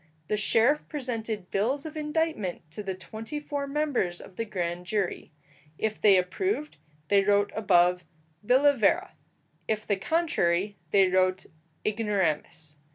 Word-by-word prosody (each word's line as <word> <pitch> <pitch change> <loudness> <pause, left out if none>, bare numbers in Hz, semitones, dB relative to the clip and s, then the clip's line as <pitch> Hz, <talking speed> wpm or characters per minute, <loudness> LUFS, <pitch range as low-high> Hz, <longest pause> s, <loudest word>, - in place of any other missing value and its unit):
The 210 - +2
sheriff 230 +7 +2
presented 225 - -4
bills 255 +9 0
of 315 0 -7
indictment 300 - -2
to 190 - -6
the 195 -2 -4
twenty 220 - -7
four 285 -1 -4
members 275 -12 -1
of 190 - -12
the 230 - -3
grand 180 -4 -3
jury. 195 -4 -2 0.5
If 215 -1 -2
they 200 -2 +6
approved, 300 - -1 0.3
they 200 -1 +5
wrote 205 0 +2
above, 180 -4 +3 0.4
billa 275 +6 +4
vera; 335 - +2 0.5
if 215 -1 -1
the 205 - 0
contrary, 200 - +1
they 195 -2 +5
wrote 185 0 +1 0.4
ignoramus. 175 -8 -1
210 Hz, 135 wpm, -27 LUFS, 185-280 Hz, 0.5 s, they